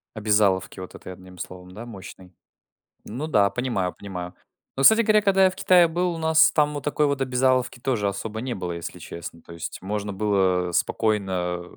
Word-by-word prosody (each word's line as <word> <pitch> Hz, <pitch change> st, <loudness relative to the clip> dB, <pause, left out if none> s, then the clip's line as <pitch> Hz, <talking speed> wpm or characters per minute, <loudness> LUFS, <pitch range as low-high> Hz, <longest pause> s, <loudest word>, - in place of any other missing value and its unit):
Обязаловки 105 Hz, -3 st, +1 dB
вот 90 Hz, -, -9 dB
этой -, -, -10 dB
одним 90 Hz, 0 st, -13 dB
словом, 90 Hz, +1 st, -9 dB
да, 110 Hz, +5 st, -9 dB
мощной. 95 Hz, -4 st, -11 dB, 0.7 s
Ну 125 Hz, +8 st, -5 dB
да, 105 Hz, -10 st, +3 dB
понимаю, 115 Hz, -8 st, -2 dB
понимаю. 90 Hz, -2 st, -7 dB, 0.4 s
Но, 135 Hz, -, 0 dB
кстати 220 Hz, +8 st, +7 dB
говоря, 215 Hz, -1 st, +3 dB
когда 195 Hz, -1 st, +4 dB
я -, -, +5 dB
в 185 Hz, -, -10 dB
Китае 180 Hz, -2 st, +5 dB
был, 175 Hz, +2 st, -1 dB
у 165 Hz, -, -6 dB
нас 160 Hz, 0 st, +5 dB
там 150 Hz, -1 st, +1 dB
вот 145 Hz, -, -5 dB
такой 150 Hz, +1 st, +1 dB
вот 140 Hz, -1 st, -1 dB
обязаловки 130 Hz, -1 st, +1 dB
тоже 115 Hz, -6 st, -1 dB
особо 105 Hz, +3 st, -4 dB
не 125 Hz, -1 st, -3 dB
было, 90 Hz, -2 st, -4 dB
если 85 Hz, -1 st, -7 dB
честно. 85 Hz, 0 st, -9 dB
То 85 Hz, -, -13 dB
есть 85 Hz, -, -7 dB
можно 105 Hz, +1 st, -4 dB
было, 95 Hz, -3 st, +1 dB
э, 85 Hz, -, -8 dB
спокойно 95 Hz, -6 st, -1 dB
105 Hz, 195 wpm, -24 LUFS, 95-140 Hz, 0.7 s, кстати